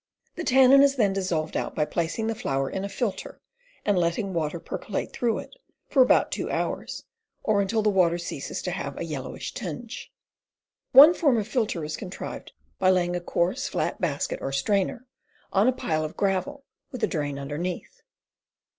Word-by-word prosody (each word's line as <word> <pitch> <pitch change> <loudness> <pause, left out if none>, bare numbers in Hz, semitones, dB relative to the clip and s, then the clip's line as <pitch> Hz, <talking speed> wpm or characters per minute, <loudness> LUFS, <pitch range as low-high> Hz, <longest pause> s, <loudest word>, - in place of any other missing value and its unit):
The 345 - -4
tannin 265 -1 +6
is 280 0 +4
then 210 -7 +2
dissolved 175 -5 -2
out - - -2
by 150 - +1
placing 170 +7 -2
the 225 - 0
flour 135 -10 -1
in 190 - -3
a 200 - -3
filter 210 -2 -4 0.5
and 205 -3 +3
letting 175 +4 0
water 165 0 -2
percolate 195 - -5
through 235 -2 0
it - - -8 0.4
for 270 - +4
about 255 - +4
two - - -3
hours, - - -3 0.4
or 210 -2 +2
until 220 +2 0
the 210 - +3
water 175 -3 +3
ceases 170 - -5
to - - -2
have - - -5
a - - -3
yellowish - - -5
tinge. - - -6 0.8
One 290 +6 +10
form 285 -8 +2
of 210 -2 -1
filter 215 -8 -1
is 155 - -4
contrived 190 -3 -7 0.3
by 185 - +4
laying 180 -1 +2
a 175 - -2
coarse, 185 +11 0
flat - - -2
basket 150 -5 -1
or 135 - -3
strainer 200 - 0 0.5
on 200 +4 +4
a - - +6
pile 155 -10 -1
of 155 - -6
gravel 195 +8 -1 0.3
with 255 - -6
a - - +4
drain 145 -3 -2
underneath. 150 +6 -5
190 Hz, 180 wpm, -26 LUFS, 170-230 Hz, 0.8 s, One